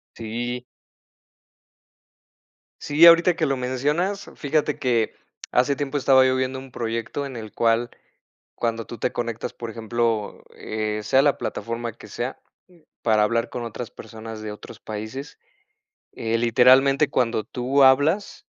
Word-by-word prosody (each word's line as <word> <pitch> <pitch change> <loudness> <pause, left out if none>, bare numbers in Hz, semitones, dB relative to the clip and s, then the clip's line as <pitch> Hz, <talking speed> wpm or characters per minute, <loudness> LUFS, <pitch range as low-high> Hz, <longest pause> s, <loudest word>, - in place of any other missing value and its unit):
Sí. 120 +2 -4 2.2
Sí, 150 +3 +5
ahorita 170 +1 +7
que 160 - 0
lo 135 -2 0
mencionas, 150 +11 -1
fíjate 150 0 -1
que 120 -4 +1 0.4
hace 130 +3 +2
tiempo 145 0 -2
estaba 130 -1 +5
yo 130 0 +2
viendo 130 0 -2
un 135 0 -12
proyecto 115 +4 -3
en 135 -2 -7
el 110 -2 -7
cual 115 +1 +1 0.7
cuando 115 -1 -2
tú 120 - -8
te 120 - 0
conectas, 115 -2 -4
por 115 -1 -7
ejemplo, 115 -1 -2
eh, 110 0 -3
sea 130 +6 +3
la 145 -1 +3
plataforma 115 0 -4
que 110 - -14
sea, 125 +3 -5 0.6
para 110 -2 +3
hablar 115 +2 +1
con 120 - -5
otras 115 0 -6
personas 110 -1 -9
de 110 - -5
otros 105 - -11
países, 110 +7 -7 0.7
eh, 115 0 -1
literalmente, 130 +5 +5
cuando 115 -6 0
tú 130 +5 +1
hablas, 145 +9 +3
120 Hz, 140 wpm, -23 LUFS, 115-135 Hz, 2.2 s, ahorita